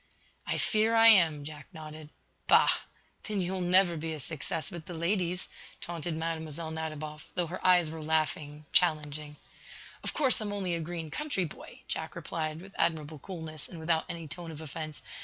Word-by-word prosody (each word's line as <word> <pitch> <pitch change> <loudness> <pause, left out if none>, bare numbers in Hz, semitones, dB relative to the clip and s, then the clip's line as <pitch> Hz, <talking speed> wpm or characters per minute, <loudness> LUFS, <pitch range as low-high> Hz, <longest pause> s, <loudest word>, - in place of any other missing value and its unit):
'" - - -34
"I - - 0
fear 220 +1 +3
I 225 0 +9
am," 165 -9 +6
Jack 150 0 -8
nodded. 155 -1 -9 0.4
"Bah! - - +7 0.6
Then 210 -3 -1
you 180 0 0
will 190 - -2
never 180 0 +5
be 160 +1 -3
a 155 - -5
success 160 +5 -3
with 170 -3 -8
the 175 - -6
ladies," 180 +1 0 0.3
taunted 170 -1 -3
Mlle. 160 -1 -3
Nadiboff, 155 -1 -5
though 180 -1 +2
her 175 +3 -6
eyes 180 -4 +5
were 160 0 -6
laughing, 155 -1 -1
challenging. 150 -3 +2 0.7
"Of - - -2
course, 265 -6 +3
I'm 210 -1 -2
only 195 -3 -1
a 170 - 0
green 165 -1 -4
country 295 -12 -1
boy," 155 - -10
Jack - - -2
replied, 155 0 -3
with 195 +2 -12
admirable 155 -2 0
coolness, 160 -3 -5
and 175 - -8
without 160 0 +1
any 170 -2 -5
tone 170 +3 -7
of 155 -2 -7
offence. 155 0 -6
160 Hz, 180 wpm, -30 LUFS, 155-180 Hz, 0.7 s, I